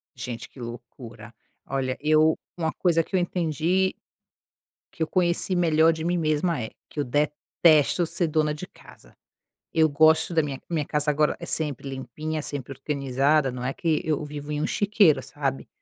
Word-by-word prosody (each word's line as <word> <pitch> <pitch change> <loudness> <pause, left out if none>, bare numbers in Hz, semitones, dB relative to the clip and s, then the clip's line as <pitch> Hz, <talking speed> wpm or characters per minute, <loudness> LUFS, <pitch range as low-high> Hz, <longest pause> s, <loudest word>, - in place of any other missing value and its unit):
Gente, 120 0 -6
que 130 - -16
loucura. 115 -1 -10 0.3
Olha 130 -1 -2
eu 155 +1 +4 0.2
uma 160 -2 -1
coisa 165 -3 +2
que 190 - -5
eu - - +4
entendi 175 +2 0 1.0
que - - -12
eu - - -2
conheci 180 +1 +1
melhor 165 -2 +4
de 160 0 -5
mim 175 +1 0
mesma 155 -1 0
é: 110 - -4 0.2
que 150 - -7
eu - - +2
detesto 150 +4 +2
ser 170 +1 -1
dona 155 -1 +1
de 165 +5 -7
casa. - - -18 0.6
Eu 160 -1 +4
gosto 160 +3 +4
da 165 - +4
minha 140 -2 -5
minha 155 -4 -1
casa 150 0 +1
agora 150 +1 +1
é - - -6
sempre 145 -3 -2
limpinha, 135 +4 -5
sempre 140 -2 -5
organizada, 140 +1 +1
não 125 0 -6
é 135 - -1
que 160 -3 0
eu 155 -1 0
vivo 145 0 -7
em 150 - -2
um - - 0
chiqueiro, 200 -9 +3
sabe. 135 -2 -3
150 Hz, 175 wpm, -25 LUFS, 135-160 Hz, 1.0 s, eu